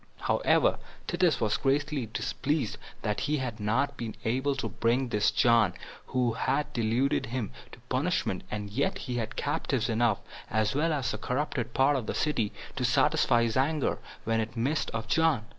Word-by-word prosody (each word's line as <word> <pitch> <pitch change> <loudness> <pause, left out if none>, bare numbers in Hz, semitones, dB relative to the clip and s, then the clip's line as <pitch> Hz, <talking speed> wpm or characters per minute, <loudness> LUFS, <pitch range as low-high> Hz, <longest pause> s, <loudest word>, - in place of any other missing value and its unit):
However, - - +3 0.3
Titus 175 -4 +2
was 110 -1 +1
greatly 140 -2 0
displeased 135 +3 -2 0.2
that 105 0 0
he 150 - +2
had 125 -5 -4
not 130 +7 0
been 115 -2 -5
able 130 +5 +1
to 135 -4 -2
bring 120 +5 0
this 105 -2 +3
John, 115 -6 +4 0.3
who 125 -2 +1
had 150 +5 -1
deluded 120 +4 +1
him, 120 -3 -3 0.2
to - - -12
punishment; 130 - -1
yet 105 - -1
he 125 -8 -4
had 110 -2 -3
captives - - -1
enough, 115 -2 +2 0.3
as 110 0 +1
well 155 +4 +1
as 135 -5 0
the - - -4
corrupted 125 -3 -2
part 140 +2 +4
of 125 -5 -2
the - - -2
city, 120 -9 0 0.3
to - - -1
satisfy 120 0 +3
his 115 -2 0
anger, 145 +2 +1 0.2
when 115 0 +1
it 110 +1 -3
missed 140 +7 0
of 115 0 -4
John. 160 -6 +2
125 Hz, 170 wpm, -29 LUFS, 110-140 Hz, 0.3 s, John